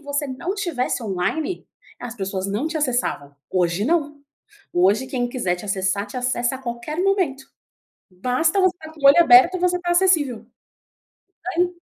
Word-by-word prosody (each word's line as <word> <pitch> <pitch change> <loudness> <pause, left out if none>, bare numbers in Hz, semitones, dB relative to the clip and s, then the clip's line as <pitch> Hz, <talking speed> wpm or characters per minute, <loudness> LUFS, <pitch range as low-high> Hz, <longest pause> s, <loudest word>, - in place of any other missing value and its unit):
você 285 0 -3
não 275 +8 -4
tivesse 345 -13 -2
online, 225 - -2 0.4
as 245 -1 -7
pessoas 195 -2 -4
não 210 +9 -2
te 320 0 -3
acessavam. 245 - -2
Hoje 180 +1 0
não. 295 -1 0 0.5
Hoje 200 +8 +2
quem 245 -2 -2
quiser 235 -8 -1
te 180 - -10
acessar, 195 0 -1
te 205 - -9
acessa 250 0 -1
a - - -6
qualquer 240 +6 -5
momento, 370 -9 0 0.7
basta 255 - 0
você 370 -1 +2
tá 315 -1 -11
com 315 - -17
o 275 - +6
olho 280 +5 +7
aberto 260 +7 +7
e - - -7
você 360 0 +1
tá 350 0 -4
acessível. 330 -10 +2 1.1
Tem 355 +1 0
260 Hz, 165 wpm, -22 LUFS, 210-325 Hz, 1.1 s, olho